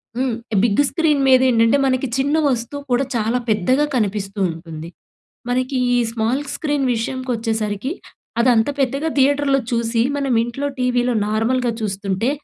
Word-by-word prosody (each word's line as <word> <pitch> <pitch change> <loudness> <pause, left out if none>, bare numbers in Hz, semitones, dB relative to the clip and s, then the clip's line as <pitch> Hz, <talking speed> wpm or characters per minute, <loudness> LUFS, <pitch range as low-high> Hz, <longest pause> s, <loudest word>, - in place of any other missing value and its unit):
హ్మ్. 250 -2 0 0.3
Big 230 +1 +3
screen 310 -4 +1
మీద 260 -1 +6
ఏంటంటే, 230 +2 +4
మనకి 260 0 +1
చిన్న 285 +3 +1
వస్తువు 250 +3 -3
కూడా, 250 +3 +2
చాలా 230 +2 0
పెద్దగా 255 +8 +2
కనిపిస్తూ 205 -2 -2
ఉంటుంది. 165 -1 -9 0.6
మనకి 255 +2 0 0.2
ఈ - - +3
స్మాల్ 230 +5 -1
స్క్రీన్ 290 -3 -1
విషయంకోచ్చేసరికి, 225 -2 -2 0.5
అదంత 235 0 +3
పెద్దగా 275 +4 0
థియేటర్‌లో 275 0 +3
చూసి, 230 0 0 0.2
మనం 275 -3 0
ఇంట్లో 240 +5 -3
టీవీలో 250 0 +1
నార్మల్‌‌గా 235 +3 0
చూస్తుంటే, 195 +2 -1
245 Hz, 130 wpm, -20 LUFS, 220-270 Hz, 0.6 s, మీద